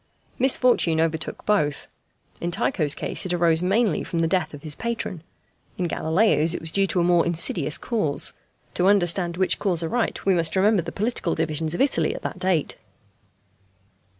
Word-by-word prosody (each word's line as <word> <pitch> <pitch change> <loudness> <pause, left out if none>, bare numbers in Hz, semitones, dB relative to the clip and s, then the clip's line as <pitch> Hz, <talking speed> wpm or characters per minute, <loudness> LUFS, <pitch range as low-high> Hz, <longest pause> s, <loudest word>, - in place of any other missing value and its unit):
Misfortune 250 -10 +2
overtook 160 -1 -2
both. 150 -9 0 0.6
In 175 - -1
Tycho's 175 - 0
case - - -2
it 180 - -2
arose 170 -2 +2
mainly 195 -1 +1
from 170 - -5
the 165 0 +2
death 170 -2 0
of 140 - -13
his 155 -2 -4
patron. 225 -5 -4 0.6
In 180 - -1
Galileo's 165 -1 +1
it - - -3
was 160 0 -4
due 195 +2 +2
to 180 - 0
a - - +2
more 175 -1 +4
insidious 165 -2 0
cause, 160 -12 -1 0.4
to 180 - +1
understand 175 -3 +2
which 190 0 +1
cause 175 -5 -1
aright 225 +8 -2
we 195 - +4
must 165 -1 0
remember 200 +1 +3
the 170 +1 -7
political 205 -4 -1
divisions 160 0 -2
of - - -1
Italy 275 - +2
at - - -8
that - - -5
date. 185 -5 0
175 Hz, 175 wpm, -24 LUFS, 160-195 Hz, 0.6 s, more